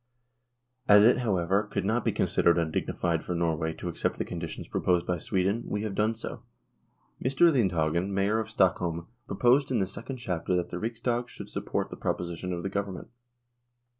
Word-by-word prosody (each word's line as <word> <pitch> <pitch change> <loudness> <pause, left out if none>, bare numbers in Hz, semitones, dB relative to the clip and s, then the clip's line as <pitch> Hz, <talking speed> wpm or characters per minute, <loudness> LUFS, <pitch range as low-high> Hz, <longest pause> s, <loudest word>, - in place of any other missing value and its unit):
As 105 0 +8
it, 120 - +5
however, 95 -4 +1
could 100 -2 -3
not 110 +3 +1
be - - +2
considered 85 0 +2
undignified 85 0 -1
for 90 - -3
Norway 80 -2 0
to 90 - -7
accept 85 - -2
the - - -2
conditions 85 -2 -6
proposed 90 -1 +1
by 90 -1 -1
Sweden, 95 +7 0
we 105 +1 -2
have 110 -2 -3
done 110 +3 +1
so. 110 - -7 0.8
Mr. 135 +6 +4
Lindhagen, 90 - +1
Mayor 100 +3 +1
of 110 -1 -3
Stockholm, 90 -5 +1 0.2
proposed 130 +3 +3
in 130 - +1
the 95 - +2
Second 125 +7 -6
Chamber 90 -6 -2
that 90 -1 -1
the 90 - -3
Riksdag 120 +2 -2
should - - -9
support - - -3
the - - -7
proposition 90 +1 -3
of 85 -1 -3
the - - -1
Government. 100 -2 -4
95 Hz, 175 wpm, -28 LUFS, 85-110 Hz, 0.8 s, As